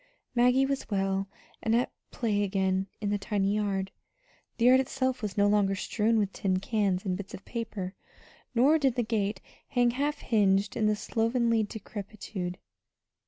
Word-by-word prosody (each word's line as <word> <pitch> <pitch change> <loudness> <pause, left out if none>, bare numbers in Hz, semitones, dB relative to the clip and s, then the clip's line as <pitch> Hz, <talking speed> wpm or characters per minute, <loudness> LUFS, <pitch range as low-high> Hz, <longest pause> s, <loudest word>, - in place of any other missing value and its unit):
Maggie 250 +2 +4
was 275 0 -2
well, 195 -1 0 0.3
and 225 0 +2
at 245 - +1 0.2
play 215 -4 0
again 190 -1 0
in 205 -1 -1
the 205 - 0
tiny 200 -1 0
yard. 195 -2 -1 0.7
The 230 - +2
yard 255 +1 +7
itself 260 -1 -1
was 210 -3 -4
no 200 - +5
longer 205 -1 +3
strewn 220 +3 +1
with 200 -2 0
tin 190 -2 0
cans 195 -2 0
and 185 -2 0
bits 195 0 -7
of 195 - -13
paper, 215 -6 -4 0.6
nor 280 +7 +5
did 270 -4 +2
the 245 - +1
gate 210 -3 -1 0.3
hang 245 -2 +2
half 285 +4 -1
hinged 205 -2 +2
in 215 -1 +2
slovenly 230 +1 +1
decrepitude. 200 -3 -6
210 Hz, 160 wpm, -29 LUFS, 195-235 Hz, 0.7 s, yard